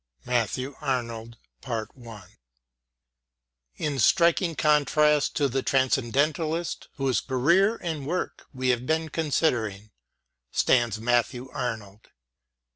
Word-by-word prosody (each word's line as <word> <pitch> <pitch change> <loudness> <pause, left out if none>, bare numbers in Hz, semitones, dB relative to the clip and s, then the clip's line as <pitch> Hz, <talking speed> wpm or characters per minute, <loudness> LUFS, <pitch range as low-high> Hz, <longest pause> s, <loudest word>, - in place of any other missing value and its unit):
MATTHEW 125 +3 -1
ARNOLD 115 -4 -3 2.4
IN 145 -3 -2
striking 170 - +3
contrast 150 0 +3
to 145 - +2
the 135 +1 -1
Transcendentalist 145 +6 0
whose 135 -3 0
career 170 - +2
and 155 -5 -4
work 180 +4 -3
we 130 -1 -2
have 125 0 0
been 160 0 0
considering 120 - -1 0.6
stands 120 -4 +2
Matthew 120 +2 0
Arnold. 110 -3 -5
135 Hz, 90 wpm, -26 LUFS, 120-155 Hz, 2.4 s, striking